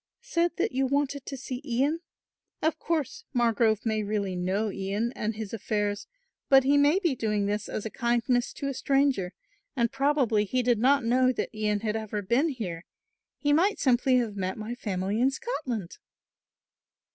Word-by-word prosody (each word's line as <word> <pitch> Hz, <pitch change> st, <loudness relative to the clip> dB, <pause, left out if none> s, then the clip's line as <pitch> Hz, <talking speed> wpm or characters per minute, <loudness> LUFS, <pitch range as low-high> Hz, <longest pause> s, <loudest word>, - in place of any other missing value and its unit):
"Said 345 Hz, -8 st, 0 dB
that -, -, 0 dB
you 265 Hz, +1 st, +1 dB
wanted 280 Hz, 0 st, -1 dB
to 275 Hz, -, -5 dB
see 255 Hz, 0 st, -6 dB
Ian. 280 Hz, +4 st, 0 dB, 0.6 s
Of 315 Hz, +1 st, 0 dB
course 335 Hz, -, -2 dB
Margrove 230 Hz, -2 st, +2 dB
may 220 Hz, -1 st, +1 dB
really 200 Hz, -2 st, -2 dB
know 190 Hz, +4 st, -1 dB
Ian 200 Hz, +5 st, -2 dB
and 215 Hz, +1 st, -2 dB
his 215 Hz, -1 st, -6 dB
affairs 205 Hz, -, -2 dB, 0.4 s
but 270 Hz, -1 st, +7 dB
he 280 Hz, +2 st, +3 dB
may 290 Hz, +4 st, +5 dB
be 345 Hz, -7 st, +1 dB
doing 210 Hz, -4 st, 0 dB
this 205 Hz, +1 st, -2 dB
as 215 Hz, -, -4 dB
a 220 Hz, -, -4 dB
kindness 240 Hz, 0 st, +1 dB
to 280 Hz, -, -4 dB
a 275 Hz, -, -1 dB
stranger 270 Hz, -9 st, +1 dB, 0.4 s
and 235 Hz, -2 st, +1 dB
probably 270 Hz, -6 st, +2 dB
he 255 Hz, +5 st, 0 dB
did 240 Hz, -2 st, +2 dB
not 270 Hz, +1 st, +3 dB
know 255 Hz, +2 st, +4 dB
that -, -, -3 dB
Ian 210 Hz, -1 st, 0 dB
had 215 Hz, -1 st, -1 dB
ever 215 Hz, -2 st, -3 dB
been 250 Hz, -, +2 dB
here, 185 Hz, -, -5 dB, 0.5 s
he 290 Hz, -1 st, +1 dB
might 375 Hz, +7 st, +3 dB
simply 255 Hz, 0 st, +3 dB
have 230 Hz, -4 st, -1 dB
met 190 Hz, -1 st, -3 dB
my 215 Hz, +2 st, -5 dB
family 205 Hz, -2 st, -2 dB
in 260 Hz, -, +5 dB
Scotland." 265 Hz, -, -4 dB
240 Hz, 175 wpm, -27 LUFS, 210-275 Hz, 0.6 s, but